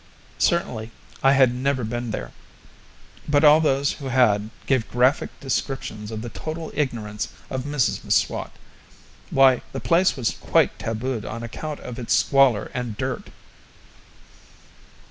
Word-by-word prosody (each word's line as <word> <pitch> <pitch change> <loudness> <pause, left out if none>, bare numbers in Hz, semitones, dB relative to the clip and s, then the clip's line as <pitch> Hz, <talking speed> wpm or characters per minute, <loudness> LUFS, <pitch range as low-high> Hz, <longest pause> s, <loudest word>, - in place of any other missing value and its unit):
Certainly, 120 -11 0 0.3
I 135 0 +5
had 130 -3 +5
never 130 0 -1
been 120 +2 -3
there; 65 - -5 1.0
but 145 0 +3
all 150 +1 +7
those 140 -2 +2
who 140 - -7
had 110 -5 +3 0.2
gave 130 -4 +1
graphic 125 +4 +2
descriptions 130 -5 -3
of 110 -1 -5
the 120 - -5
total 160 +6 -6
ignorance 110 -8 -2 0.2
of 130 0 -3
Mrs 145 -4 0
M'Swat. - - 0 0.8
Why, 135 -2 +5
the - - -3
place 175 0 +2
was 120 -4 0
quite - - +2
tabooed 115 +1 -3
on 115 +2 -6
account 150 +6 -6
of 125 0 -7
its 120 - +1
squalor 135 -6 +3
and 120 -4 -4
dirt! - - -4
130 Hz, 135 wpm, -23 LUFS, 115-140 Hz, 1.0 s, all